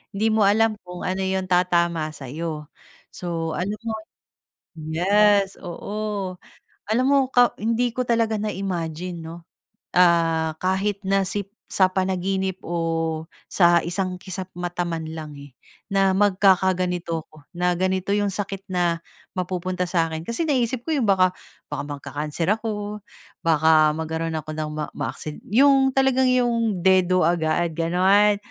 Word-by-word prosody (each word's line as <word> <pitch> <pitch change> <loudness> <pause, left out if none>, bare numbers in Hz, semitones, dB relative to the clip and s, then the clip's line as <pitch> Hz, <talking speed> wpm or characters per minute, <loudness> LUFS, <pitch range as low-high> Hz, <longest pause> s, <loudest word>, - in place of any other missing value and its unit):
Hindi 215 +3 +1
mo 215 -2 +3
alam 220 +1 +3
kung 180 0 -8
ano 190 +1 -1
'yong 190 0 -1
tatama 170 -3 +2
sa'yo, 150 +2 -6 0.5
so 165 -2 -3
alam 200 +4 -2
mo. 225 -1 -2 0.9
Yes, 195 +5 +2
oo. 200 +1 -4 0.5
Alam 250 +4 +2
mo 280 0 +5
ka 245 -1 +4
hindi 230 +2 +1
ko 255 - +1
talaga 230 -2 +1
na 210 +1 -2
imagine 175 -2 -4
'no, 165 +1 -7 0.6
ah, 165 -2 +3
kahit 195 +2 0
na 195 0 +3
si 200 +1 -2 0.2
sa 185 -1 +3
panaginip 190 0 -1
o 165 -1 -2 0.2
sa 175 -2 +4
isang 180 +2 -2
kisap-mata 180 -2 -4
man 165 -1 -3
lang, 155 -2 -7
eh, 140 -2 -12 0.4
na 195 -1 +3
magkakaganito 185 -4 +2
ako. 155 -2 -18
Na 180 0 +2
ganito 185 +1 0
'yung 205 -1 +1
sakit 195 -1 -4
na 175 -2 0 0.4
mapupunta 180 0 -2
sa 170 -2 +2
akin. 160 0 -4
Kasi 235 +8 -1
naisip 250 -3 0
ko 320 - +1
'yung 240 -7 +1
baka 185 -1 +4 0.4
baka 145 -1 -3
magka-cancer 150 +3 -4
ako, 210 -1 -4 0.4
baka 155 -1 +5
magkaroon 160 0 -3
ako 155 0 -6
ng 155 -1 -3
ma 150 -1 -2
maaksi 155 -1 -5
'yung 270 +3 +5
talagang 265 -1 +3
'yung 235 -5 +1
dedo 185 -2 +4
agad 170 0 +1
ganon. 190 +5 +3
185 Hz, 140 wpm, -23 LUFS, 165-205 Hz, 0.9 s, mo